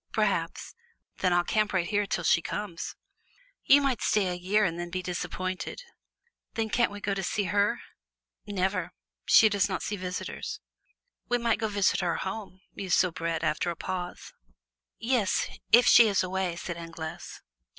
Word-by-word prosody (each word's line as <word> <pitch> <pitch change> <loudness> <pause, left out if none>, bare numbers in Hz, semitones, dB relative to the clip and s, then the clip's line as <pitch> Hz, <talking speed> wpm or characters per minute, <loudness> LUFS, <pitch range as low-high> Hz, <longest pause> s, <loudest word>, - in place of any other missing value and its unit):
"Perhaps." - - -1 0.5
"Then 185 - +2
I'll 175 0 +3
camp 215 +3 0
right 185 -3 +1
here 205 +1 0
till 175 - -2
she 165 - +4
comes!" 185 -2 -5 0.7
"You 285 +1 +6
might 265 -3 0
stay 200 -3 +2
a - - -1
year 190 +4 +1
and 170 -1 -2
then 175 0 -4
be 185 +1 -4
disappointed." 185 - -4 0.7
"Then 220 -1 -1
can't 235 +2 +3
we 205 - -7
go 200 0 -1
to 195 - -2
see 205 +3 -1
her?" 200 +3 +1 0.7
"Never; 185 -3 -1 0.3
she 220 - +7
does 205 -1 +1
not 190 - -3
see 205 - -3
visitors." 180 -1 -5 0.7
"We 245 - +3
might 235 -1 +1
go 220 - 0
visit 200 -2 +1
her 170 - 0
home," 190 -1 -5
mused 190 -3 0
Soubrette, 165 -2 0
after 155 +2 0
a 170 - -3
pause. 180 +1 -5 0.6
"Yes, 230 -4 +1 0.2
if 240 +2 +7
she 235 - +8
is 200 -2 +2
away," 185 -1 -2
said 170 0 -5
Anglaise. 165 -1 -8
190 Hz, 165 wpm, -28 LUFS, 175-210 Hz, 0.7 s, she